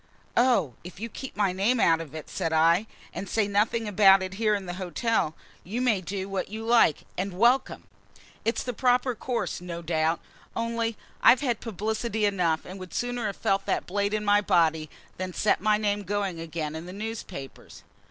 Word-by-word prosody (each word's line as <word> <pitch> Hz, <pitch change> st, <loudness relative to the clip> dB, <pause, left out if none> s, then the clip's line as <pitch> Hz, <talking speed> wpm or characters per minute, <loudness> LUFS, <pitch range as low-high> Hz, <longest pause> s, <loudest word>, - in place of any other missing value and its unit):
"Oh, 235 Hz, -, +3 dB
if 180 Hz, +1 st, -10 dB
you 230 Hz, +2 st, -4 dB
keep 265 Hz, 0 st, -8 dB
my 200 Hz, -3 st, +2 dB
name 210 Hz, +7 st, +2 dB
out 165 Hz, -4 st, +4 dB
of 155 Hz, -2 st, -9 dB
it," 155 Hz, -, -7 dB
said 165 Hz, -, -2 dB
I, 165 Hz, +6 st, +4 dB, 0.3 s
"and 195 Hz, -, -5 dB
say 215 Hz, 0 st, +1 dB
nothing 215 Hz, +2 st, +1 dB
about 195 Hz, -1 st, +6 dB
it 185 Hz, 0 st, -5 dB
here 215 Hz, -1 st, +3 dB
in 200 Hz, -2 st, -4 dB
the 175 Hz, -, -5 dB
hotel, 185 Hz, -3 st, 0 dB, 0.3 s
you 215 Hz, +7 st, -4 dB
may 235 Hz, -6 st, +2 dB
do 190 Hz, +1 st, -4 dB
what 195 Hz, -1 st, -3 dB
you 220 Hz, +2 st, -6 dB
like, 230 Hz, -10 st, +4 dB, 0.2 s
and 185 Hz, -1 st, -3 dB
welcome! 240 Hz, +5 st, +3 dB, 0.6 s
It's 230 Hz, -, 0 dB
the 250 Hz, -, -3 dB
proper 250 Hz, +1 st, +2 dB
course, 235 Hz, -4 st, -3 dB
no 170 Hz, -1 st, -6 dB
doubt; 160 Hz, 0 st, +1 dB, 0.4 s
only 230 Hz, -1 st, -1 dB, 0.2 s
I've 250 Hz, -, +7 dB
had 245 Hz, -6 st, 0 dB
publicity 220 Hz, +1 st, -2 dB
enough, 180 Hz, -6 st, +1 dB
and 185 Hz, +2 st, -8 dB
would 185 Hz, -2 st, -9 dB
sooner 245 Hz, -2 st, -1 dB
have 200 Hz, -, -5 dB
felt 195 Hz, 0 st, 0 dB
that -, -, 0 dB
blade 200 Hz, +2 st, 0 dB
in 210 Hz, 0 st, -2 dB
my 205 Hz, 0 st, +5 dB
body 160 Hz, -5 st, +2 dB, 0.3 s
than 185 Hz, 0 st, -4 dB
set 210 Hz, -, +2 dB
my 210 Hz, +1 st, +3 dB
name 205 Hz, -1 st, 0 dB
going 200 Hz, -3 st, -2 dB
again 160 Hz, -2 st, -4 dB
in 160 Hz, +2 st, -7 dB
the 180 Hz, -, -8 dB
newspapers." 205 Hz, -9 st, -7 dB
200 Hz, 190 wpm, -27 LUFS, 175-225 Hz, 0.6 s, I've